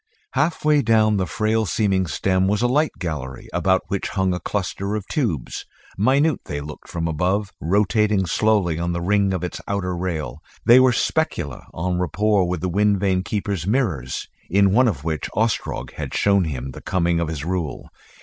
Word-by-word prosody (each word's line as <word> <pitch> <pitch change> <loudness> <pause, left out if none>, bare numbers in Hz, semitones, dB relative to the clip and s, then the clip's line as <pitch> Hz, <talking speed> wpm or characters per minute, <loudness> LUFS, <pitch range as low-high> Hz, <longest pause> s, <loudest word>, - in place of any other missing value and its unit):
Halfway 150 -2 +2
down 110 -3 +3
the 95 -2 0
frail 110 +2 0
seeming 95 -4 +1
stem 95 +5 +1
was 105 +3 +1
a - - +4
light 150 +5 +2
gallery 75 -8 -5
about 95 -1 +2
which 100 - -2
hung 95 -2 0
a 90 - -2
cluster 100 +1 -3
of 105 -3 -4
tubes 105 - -2 0.3
minute 135 - +2
they 75 - -4
looked 75 +1 -9
from 85 -1 -2
above 95 +6 0
rotating 105 +2 +2
slowly 90 -2 +1
on 85 0 -1
the 85 - -2
ring 100 +2 +2
of 90 -2 -2
its 90 - -4
outer 90 -3 -1
rail. 85 -3 -3 0.3
These 120 +2 +8
were 130 -1 +5
the 120 - -1
specula, 85 - -1
en 90 +1 -1
rapport 100 +1 +1
with 90 -2 -2
the 90 - -1
wind 100 +2 +2
vane 95 -2 +1
keeper's 100 -3 -3
mirrors, 95 - -1 0.2
in 100 +1 +4
one 125 +3 +5
of 85 -10 -2
which 80 -3 -2
Ostrog 110 +1 -1
had - - -5
shown 100 -2 +3
him 65 -4 -4
the - - -10
coming 85 -2 +1
of 85 - -1
his 80 -2 -4
rule. 85 -4 -3
95 Hz, 185 wpm, -22 LUFS, 85-105 Hz, 0.3 s, These